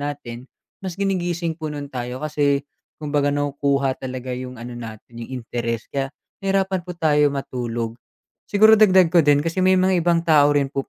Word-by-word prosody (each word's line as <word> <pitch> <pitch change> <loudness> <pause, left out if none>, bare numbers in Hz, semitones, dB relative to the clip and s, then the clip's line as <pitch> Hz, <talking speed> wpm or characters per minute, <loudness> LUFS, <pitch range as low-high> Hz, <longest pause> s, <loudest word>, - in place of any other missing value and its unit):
natin, 135 -4 -6 0.3
mas 185 -2 -6
ginigising 175 -4 -1
po 160 -1 -6
nu'n 145 -1 -7
tayo 125 +3 -5
kasi, 145 -2 +1 0.3
kumbaga 145 -1 0
nakukuha 140 -1 0
talaga 130 -1 -5
yung 125 0 -6
ano 120 +1 -8
natin, 115 0 -9
yung 125 +1 -7
interes 115 -1 -3
kaya, 135 -1 -1 0.3
nahirapan 195 -1 0
po 175 0 -9
tayo 150 -3 +3
matulog. 120 -4 -4 0.6
Siguro 220 +1 +6
dagdag 185 -4 +5
ko 175 - +6
din 145 -1 +3
kasi 165 +3 -1
may 185 0 +4
mga 185 -1 +3
ibang 170 -1 +2
tao 145 -2 +4
rin 140 -1 0
po 135 - -3
145 Hz, 170 wpm, -22 LUFS, 130-175 Hz, 0.6 s, Siguro